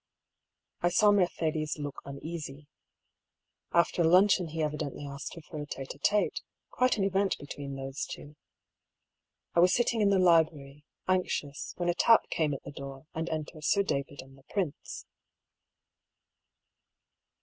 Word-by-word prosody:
I 175 - +3
saw 210 +4 +5
Mercedes 160 -6 0
look 145 -1 -6
uneasy. 145 0 -7 1.1
After 170 0 +3
luncheon 180 +2 +5
he 160 0 -3
evidently 150 -1 -3
asked 140 +2 -7
her 165 - -9
for 150 0 -7
a 145 - -6
tete 135 -2 -6
d 140 - -8
tStey 210 +8 +2 0.4
quite 255 -2 +2
an 200 - +1
event 195 0 +1
be - - -9
tween 140 -1 -6
those 135 +1 -4
two. 145 +1 -9 1.2
I - - +3
was 180 +1 +5
sitting 235 -2 +1
in 205 - +4
the 200 - +4
library, 155 -5 +2 0.2
anxious, 180 -6 -1
when 175 - -1
a 175 - +3
tap 230 +5 +4
came 150 -3 +1
at - - -9
the - - -8
door, 140 0 -9
and 160 +1 -3
enter 155 0 -5
Sir 200 +6 +3
David 140 -5 -3
and 135 0 -17
the 135 - -20
prince. 185 -8 -3
155 Hz, 150 wpm, -30 LUFS, 145-180 Hz, 1.2 s, saw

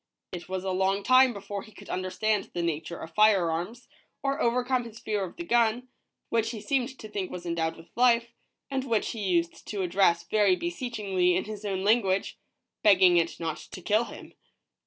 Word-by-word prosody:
It 175 0 -7
was 185 0 -3
a 190 - -2
long 190 +2 +1
time 255 +2 +6
before 200 -2 -6
he 215 - -14
could 205 - -14
understand 195 +3 -1
the 175 - -1
Nature 165 +1 -3
of 160 - -9
fire 200 -4 +4
arms, 180 +10 -5 0.4
or 275 0 -1
overcome 250 +1 +1
his 230 -2 -10
fear 210 -2 -2
of 180 - -7
the 345 - -6
gun, 240 -3 +1 0.4
which 225 -1 +1
he 225 -2 -5
seemed 260 +4 -1
to 215 - -9
think 200 -3 -4
was 180 - -7
endowed 165 -1 -1
with 165 - -15
life, 235 -1 +3 0.4
and 265 -1 -1
which 230 -5 0
he 225 - -6
used 170 -4 -1
to 200 -3 -2
address 175 -2 +2
very 200 +1 +3
beseechingly 210 - -1
in 185 - 0
his 215 -1 -8
own 190 -2 -2
language, 200 -3 +1 0.4
begging 185 -4 +6
it 170 -1 0
not 165 -2 -3
to - - -10
kill 215 +6 +1
him. - - -11
205 Hz, 195 wpm, -27 LUFS, 180-235 Hz, 0.4 s, time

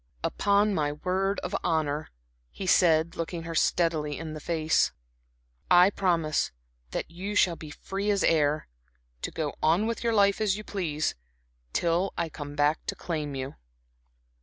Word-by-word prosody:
"Upon 205 +1 +2
my 150 -5 0
word 190 +5 -1
of 190 - -3
honor," 155 -3 0 0.4
he 195 - -7
said, 165 -3 +4
looking 165 0 -4
her 165 0 -5
steadily 155 -3 +1
in 160 -1 -6
the 155 - -6
face 160 0 +1 0.8
"I 180 +3 +7
promise 170 -6 +1 0.4
that 65 - -4
you 195 +4 -5
shall 180 -4 +4
be 155 -2 -10
free 195 +6 -4
as 200 -2 +2
air, 150 -1 +2 0.5
to - - -2
go 155 -3 -3
on 165 +7 +3
with 230 +1 -2
your 230 -1 +1
life 200 0 +4
as 205 -2 +2
you 215 - -7
please, 160 -8 -2 0.6
till 175 - 0
I 170 -1 -1
come 145 -1 -7
back 145 +2 +2
to - - -2
claim 150 -4 -3
you." 135 +1 -5
165 Hz, 160 wpm, -28 LUFS, 155-195 Hz, 0.8 s, I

